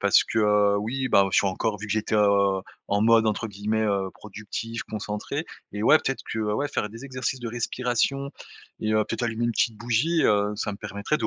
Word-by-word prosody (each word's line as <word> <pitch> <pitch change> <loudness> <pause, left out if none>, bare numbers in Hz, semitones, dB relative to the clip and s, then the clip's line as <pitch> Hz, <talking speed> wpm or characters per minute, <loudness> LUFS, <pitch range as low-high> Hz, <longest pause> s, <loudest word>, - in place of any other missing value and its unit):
Parce - - +5
que 105 -2 +3
oui, 120 +6 -2
bah, 100 - +5
je - - +1
suis - - +2
encore 105 +3 -1
vu 105 - -6
que 100 - -2
j'étais, 110 0 0
heu, 100 -2 +3 0.3
en 100 0 +1
mode 115 +1 +5
entre 110 +1 -1
guillemets, 105 +1 -2
heu, 100 -3 0
productif, 105 +2 -6
concentré. 105 +8 -4 0.3
Et 105 +1 -3
ouais, 155 +6 +7
peut-être 135 - -3
que, 110 - -2
ouais, 105 +6 0
faire 105 -7 -2
des 115 +5 -10
exercices 130 0 -3
de 120 - -6
respiration 125 +3 -1 0.5
et, 110 0 0
heu, 110 0 +3
peut-être - - -4
allumer 115 0 -1
une 120 - +1
petite 115 0 +1
bougie, 120 +9 +1
heu. 105 0 +3
Ça 105 0 -2
me - - -7
permettrait 100 +8 -2
de - - 0
110 Hz, 215 wpm, -25 LUFS, 105-120 Hz, 0.5 s, ouais